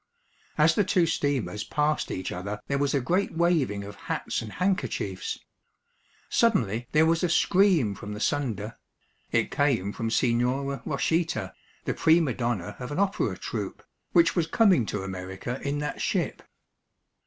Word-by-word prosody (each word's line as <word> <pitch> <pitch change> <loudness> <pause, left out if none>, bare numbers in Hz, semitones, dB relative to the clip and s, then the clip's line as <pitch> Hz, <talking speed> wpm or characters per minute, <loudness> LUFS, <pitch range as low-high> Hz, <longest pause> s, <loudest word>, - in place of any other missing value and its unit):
As 155 +1 +5
the 205 - +3
two 180 -2 +3
steamers 130 - -1
passed 150 0 0
each 95 0 -4
other 100 +3 -4
there 140 0 -1
was 145 0 +1
a - - +3
great 180 +10 0
waving 160 -12 +1
of 100 +1 -8 0.2
hats - - -1
and 110 -2 -8
handkerchiefs. 130 - -1 0.9
Suddenly 120 - +2
there 155 +1 +5
was 165 +1 +2
a 180 - +2
scream 180 - +3
from 100 +2 -7
the 105 - -6
Sunda. 115 -5 -2 0.5
It - - +1
came 115 -9 +1
from 115 -1 -2
Signora 125 +4 +1
Rochita, 165 +3 0 0.3
the - - 0
prima 160 -4 +3
donna 120 -8 -2
of 125 +2 -6
an 145 - -3
opera 200 +1 0
troupe, - - -5 0.3
which 335 - +4
was 170 -3 +1
coming 185 - +4
to 105 -2 -3
America 95 +6 -5
in 140 +1 -1
that 150 0 -3
ship. - - -1
140 Hz, 155 wpm, -27 LUFS, 105-165 Hz, 0.9 s, As